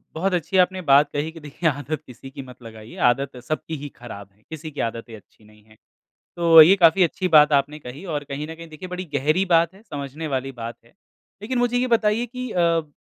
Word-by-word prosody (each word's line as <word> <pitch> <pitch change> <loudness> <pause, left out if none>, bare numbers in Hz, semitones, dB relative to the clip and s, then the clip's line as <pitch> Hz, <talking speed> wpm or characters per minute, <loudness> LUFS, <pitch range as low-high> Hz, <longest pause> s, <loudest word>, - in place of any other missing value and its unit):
बहुत 185 +4 -1
अच्छी 170 +4 -3
आपने 185 +1 -1
बात 140 +1 +5
कही 150 +2 -2
कि - - -9
देखिए 150 +3 -1
आदत 145 +1 -4
किसी 125 +2 -12
की 135 - -8
मत 125 0 -15
लगाइए, 110 0 -12
आदत 130 +2 +1
सबकी 155 +3 -4
ही 145 - -4
ख़राब 100 -5 -10
है, 105 - -33
किसी 160 0 -8
की 145 - -10
आदतें 115 0 -8
अच्छी 110 +1 -20
नहीं 105 0 -21
है। 110 - -19 0.6
तो 165 -2 +8
ये 175 +5 +7
काफ़ी 170 +3 +6
अच्छी 185 +2 -1
बात 150 0 +7
आपने 145 +2 -3
कही 135 +6 -10
और 145 0 -2
कहीं 145 +2 -5
न 160 - -8
कहीं 165 - -9
देखिए 185 +4 -9
बड़ी 185 +1 -5
गहरी 155 +7 +1
बात 165 +2 +2
है, 195 - -18
समझने 145 +2 -6
वाली 135 +1 -2
बात 115 +1 -5
है। 115 - -24 0.5
लेकिन 245 +4 -3
मुझे 245 0 +1
ये 255 +1 0
बताइए 220 +2 0
कि 250 +1 -7
अ, - - -5
ब 165 -3 +1
150 Hz, 230 wpm, -22 LUFS, 135-175 Hz, 0.6 s, तो